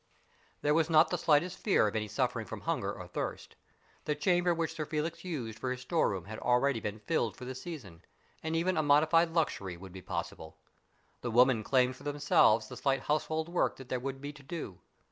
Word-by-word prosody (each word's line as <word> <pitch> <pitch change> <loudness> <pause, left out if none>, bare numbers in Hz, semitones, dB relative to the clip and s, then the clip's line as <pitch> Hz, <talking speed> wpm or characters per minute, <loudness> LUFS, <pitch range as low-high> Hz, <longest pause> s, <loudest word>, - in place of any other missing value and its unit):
There 150 - +3
was 160 +1 +2
not 160 0 +5
the - - +1
slightest 165 +4 +2
fear 195 - +3
of 105 - -3
any 105 -1 -1
suffering 115 +1 -1
from - - -7
hunger - - -1
or - - -8
thirst. - - -5 0.5
The 150 - 0
chamber 175 +3 +2
which 165 -1 -1
Sir 155 - -3
Felix 160 +2 -3
used 120 -11 -5
for 130 - -2
his 125 0 -4
store 160 +6 +1
room 95 -4 -4
had 110 +2 -7
already 125 +1 +2
been 105 0 -5
rilled 110 -5 0
for 125 - -8
the 130 - -5
season, 130 - -8 0.4
and 160 +1 -2
even 175 +2 +1
a - - +4
modified 155 +3 +4
luxury 100 - -1
would 95 0 -11
be 95 - -8
possible. 80 -2 -5 0.6
The 120 - -3
women 120 -1 +4
claimed 130 0 +2
for - - -14
themselves 145 -7 +3
the 125 - -9
slight 135 +1 +1
household 155 +2 -1
work 175 +1 0
that 130 -1 -12
there 130 - -1
would 135 +1 -5
be 145 +1 -6
to 145 - -14
do. 135 - -7
135 Hz, 210 wpm, -31 LUFS, 115-160 Hz, 0.6 s, not